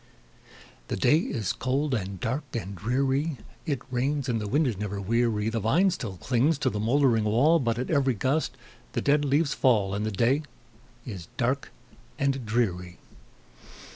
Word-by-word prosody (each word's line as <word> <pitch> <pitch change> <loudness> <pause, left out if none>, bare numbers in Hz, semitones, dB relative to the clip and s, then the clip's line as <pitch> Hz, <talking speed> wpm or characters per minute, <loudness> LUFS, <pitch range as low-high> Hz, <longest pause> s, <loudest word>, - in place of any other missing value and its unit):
The - - -2
day 155 - +4
is 110 - -2
cold, 135 +3 -1
and 100 -5 -3
dark, 130 - -2
and 100 -3 -4
dreary; 135 - 0 0.3
It 140 -5 -1
rains, 135 +3 0
and 115 -3 0
the 105 - -3
wind 145 +8 +2
is 120 -5 0
never 100 -1 -3
weary; 110 +1 +1
The 115 0 -1
vine 170 - +3
still 105 - -5
clings 130 - +1
to - - 0
the 105 - -3
moldering 115 -1 +3
wall, 140 +11 +4
But 115 -4 0
at 125 +5 -3
every 135 -5 +2
gust 135 +9 0 0.4
the - - -1
dead 145 +1 +3
leaves 145 +2 +2
fall, 105 -7 +2
And 100 +1 -1
the 110 - 0
day 120 +8 +2 0.6
is 95 -9 -7
dark - - 0 0.5
and 135 -2 0
dreary. 90 -6 -1
120 Hz, 170 wpm, -27 LUFS, 105-140 Hz, 0.6 s, day